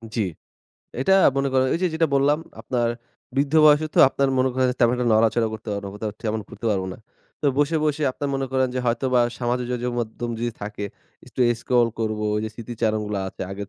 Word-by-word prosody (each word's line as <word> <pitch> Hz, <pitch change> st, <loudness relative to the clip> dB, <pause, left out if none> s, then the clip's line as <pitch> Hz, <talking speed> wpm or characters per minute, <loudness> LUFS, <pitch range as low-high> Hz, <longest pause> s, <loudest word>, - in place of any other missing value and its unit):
জ্বি। 115 Hz, -, +1 dB, 0.8 s
এটা 190 Hz, +9 st, +4 dB, 0.2 s
মনে 135 Hz, 0 st, +1 dB
করেন 130 Hz, 0 st, +3 dB
ঐযে 180 Hz, +2 st, +1 dB
যেটা 160 Hz, 0 st, +2 dB
বললাম 140 Hz, +2 st, +3 dB, 0.2 s
আপনার 120 Hz, -2 st, -1 dB, 0.5 s
বৃদ্ধ 140 Hz, +2 st, +1 dB
বয়সে 150 Hz, +1 st, +6 dB
তো -, -, +1 dB
আপনার 135 Hz, 0 st, 0 dB
মনে 130 Hz, +1 st, +3 dB
করেন 130 Hz, 0 st, +2 dB
তেমন 120 Hz, 0 st, +5 dB
একটা 125 Hz, -1 st, -1 dB
নড়াচড়া 110 Hz, +1 st, +3 dB
করতে 110 Hz, 0 st, -8 dB
পারবো 100 Hz, 0 st, -4 dB
না, -, -, -6 dB
কোথাও 105 Hz, +1 st, -4 dB
টি -, -, -47 dB
তেমন 110 Hz, 0 st, -1 dB
ঘুরতে 115 Hz, -, -7 dB
পারবো 95 Hz, -2 st, 0 dB
না। -, -, -11 dB, 0.4 s
তো -, -, 0 dB
বসে, 145 Hz, +3 st, +2 dB
বসে 150 Hz, 0 st, 0 dB
আপনার 145 Hz, -, -4 dB
মনে 135 Hz, 0 st, -1 dB
করেন 130 Hz, -1 st, +2 dB
যে -, -, -1 dB
হয়তোবা 125 Hz, +1 st, +2 dB, 0.2 s
সামাজিক 125 Hz, 0 st, -1 dB
যোগাযোগ 125 Hz, 0 st, -2 dB
মাধ্যম 120 Hz, +1 st, -4 dB
যদি 120 Hz, +1 st, -1 dB
থাকে, 105 Hz, 0 st, -5 dB, 0.4 s
একটু -, -, -7 dB, 0.2 s
স্ক্রল 120 Hz, -2 st, +2 dB
করবো 110 Hz, -1 st, -1 dB, 0.2 s
যে 110 Hz, -, -2 dB
স্মৃতিচারণগুলা 110 Hz, -3 st, -2 dB
আছে -, -, -8 dB
আগের 100 Hz, +1 st, -6 dB
120 Hz, 200 wpm, -23 LUFS, 110-135 Hz, 0.8 s, বয়সে